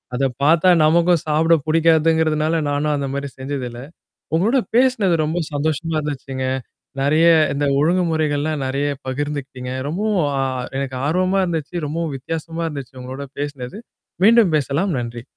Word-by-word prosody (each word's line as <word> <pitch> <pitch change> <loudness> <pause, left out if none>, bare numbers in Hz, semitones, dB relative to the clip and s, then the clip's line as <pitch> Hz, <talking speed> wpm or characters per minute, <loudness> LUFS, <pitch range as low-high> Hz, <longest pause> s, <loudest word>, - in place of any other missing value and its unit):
அத 135 - -1 0.2
பார்த்தா 165 +4 +4 0.2
நமக்கும் 170 +1 +3
சாப்பிட 160 +2 +4
புடிக்காதுங்கிறதுனால 160 0 +2
நானும் 145 +1 0
அந்தமாரி 140 0 -3
செஞ்சது 135 -1 -4
இல்ல. 120 +1 -9 0.5
உங்களோட 225 +10 +3 0.2
பேசினது 235 -8 +3
ரொம்ப 160 +3 -1
சந்தோஷமா 155 +2 -1
இருந்துச்சுங்க. 135 -3 -4 0.5
நெறைய 155 +4 +4 0.3
இந்த 145 0 0
ஒழுங்குமுறைகள்லாம் 155 -3 +1
நிறைய 140 +2 -1 0.2
பகிர்ந்துக்கிட்டீங்க. 135 -2 -4 0.2
ரொம்பவும் 200 +2 0 0.2
அ - - +1 0.4
எனக்கு 135 -2 -4
ஆர்வமா 185 +4 +1
இருந்துச்சு. 165 -1 -4
ரொம்பவும் 160 -1 -3
வித்தியாசமா 165 +4 -5
இருந்துச்சு 140 -4 -8
உங்களோட 130 +2 -6
பேசினது. 145 - -5 0.5
மீண்டும் 225 -6 +5
பேசலாம். 150 +6 -1
நன்றி. 120 0 -6
155 Hz, 125 wpm, -20 LUFS, 140-165 Hz, 0.5 s, மீண்டும்